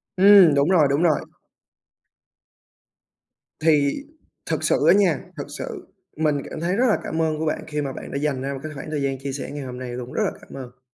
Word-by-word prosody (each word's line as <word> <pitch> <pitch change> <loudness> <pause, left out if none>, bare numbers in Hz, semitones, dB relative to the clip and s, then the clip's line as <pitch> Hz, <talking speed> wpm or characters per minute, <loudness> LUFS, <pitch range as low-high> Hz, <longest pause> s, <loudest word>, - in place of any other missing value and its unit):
Ừm, 190 -4 +7
đúng 140 +4 +2
rồi, 160 -6 +5
đúng 145 +5 +1
rồi! 160 -4 +3 2.4
Thì 150 - +2 0.5
thực - - -2
sự - - +2
á - - +8
nha, 185 -8 +3 0.2
thực - - -5
sự - - -7 0.3
mình 155 -2 +1
cảm - - -7
thấy 175 +3 -1
rất 250 +5 +2
là 215 - +3
cảm 160 0 -2
ơn 155 -1 0
của 160 - -2
bạn 155 - -2
khi 150 -1 -3
mà 135 -2 -4
bạn - - -9
đã 140 - -3
dành 140 -3 -1
ra 140 +1 -3
một 135 - -6
cái 155 - -5
khoảng 150 +2 -7
thời 150 -2 -2
gian 135 -1 -1
chia 135 0 -5
sẻ 135 - -6
ngày 145 -1 -6
hôm 125 -1 -7
nay 125 -1 -6
luôn, 125 0 -7
rất - - 0
là - - 0
cảm - - -15
ơn. 125 -1 -10
150 Hz, 230 wpm, -23 LUFS, 135-160 Hz, 2.4 s, á